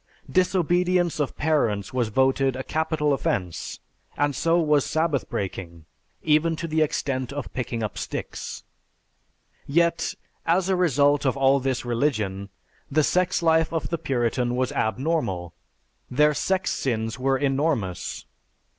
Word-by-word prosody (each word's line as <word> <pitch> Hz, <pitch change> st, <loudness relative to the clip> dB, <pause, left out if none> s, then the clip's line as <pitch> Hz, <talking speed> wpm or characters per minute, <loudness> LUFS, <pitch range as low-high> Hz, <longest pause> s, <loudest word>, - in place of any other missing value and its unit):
Disobedience 180 Hz, -2 st, +2 dB
of 145 Hz, -, -2 dB
parents 115 Hz, -11 st, 0 dB
was 125 Hz, -3 st, +1 dB
voted 135 Hz, +3 st, +2 dB
a 130 Hz, -, -4 dB
capital 155 Hz, -1 st, 0 dB
offense 90 Hz, -9 st, -2 dB, 0.4 s
and 145 Hz, -1 st, +1 dB
so 165 Hz, +5 st, +2 dB
was 150 Hz, -4 st, +3 dB
Sabbath 155 Hz, -4 st, 0 dB
breaking 85 Hz, -4 st, -5 dB, 0.4 s
even 160 Hz, +2 st, +3 dB
to 165 Hz, -, -4 dB
the 160 Hz, 0 st, +1 dB
extent 135 Hz, -4 st, -1 dB
of 145 Hz, -1 st, -6 dB
picking 120 Hz, -2 st, -3 dB
up 105 Hz, -, -4 dB
sticks. -, -, -5 dB, 1.0 s
"Yet, 170 Hz, +3 st, +1 dB, 0.3 s
as 180 Hz, +3 st, +2 dB
a 190 Hz, -, +3 dB
result 145 Hz, -5 st, +3 dB
of 130 Hz, -1 st, +1 dB
all 135 Hz, +1 st, +4 dB
this 130 Hz, 0 st, -2 dB
religion, 110 Hz, -6 st, -1 dB, 0.4 s
the 155 Hz, +2 st, +3 dB
sex 180 Hz, +2 st, +1 dB
life 160 Hz, -1 st, +3 dB
of 165 Hz, -2 st, -2 dB
the 170 Hz, -, -2 dB
Puritan 125 Hz, -4 st, 0 dB
was 130 Hz, 0 st, 0 dB
abnormal.... 110 Hz, -, -1 dB, 0.6 s
Their 150 Hz, +4 st, +4 dB
sex 190 Hz, +5 st, 0 dB
sins 115 Hz, -2 st, -2 dB
were 135 Hz, +1 st, +2 dB
enormous. 135 Hz, -, -1 dB
140 Hz, 135 wpm, -25 LUFS, 120-160 Hz, 1.0 s, all